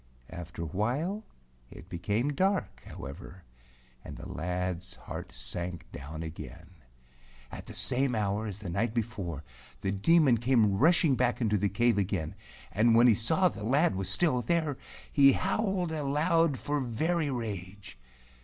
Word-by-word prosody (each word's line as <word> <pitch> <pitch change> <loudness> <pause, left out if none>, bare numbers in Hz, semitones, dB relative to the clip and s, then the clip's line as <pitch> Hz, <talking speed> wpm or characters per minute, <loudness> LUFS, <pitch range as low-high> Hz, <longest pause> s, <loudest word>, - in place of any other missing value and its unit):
After 85 0 -7
a - - -3
while 130 - -2 0.5
it - - -12
became 105 - -1
dark, 190 +4 0
however, 90 +6 -9 0.6
and - - -9
the - - -8
lad's 90 +1 -3
heart - - -8
sank 85 +7 -4
down 80 +4 -7
again. 80 +2 -9 0.8
At - - -9
the - - -9
same 130 -1 +2
hour 105 +1 -1
as 100 -2 -5
the 105 -4 -7
night 110 +5 -1
before, 100 - -3 0.4
the 95 - -1
Demon 130 - +4
came 115 -5 +3
rushing 165 -2 +4
back 125 -1 +1
into 105 -4 +1
the 100 +1 +1
cave 115 +2 +2
again, 90 -5 -2 0.4
and 115 +2 +3
when 120 +1 +6
he 120 - +7
saw 160 - +3
the 105 - -5
lad 140 - +3
was 95 0 -2
still 125 - +3
there, 155 +3 0 0.4
he 140 -2 +7
howled 190 -3 0
aloud 155 +1 +1
for 145 +2 -2
very 155 +6 0
rage. 100 -5 -6
115 Hz, 150 wpm, -29 LUFS, 95-145 Hz, 0.8 s, he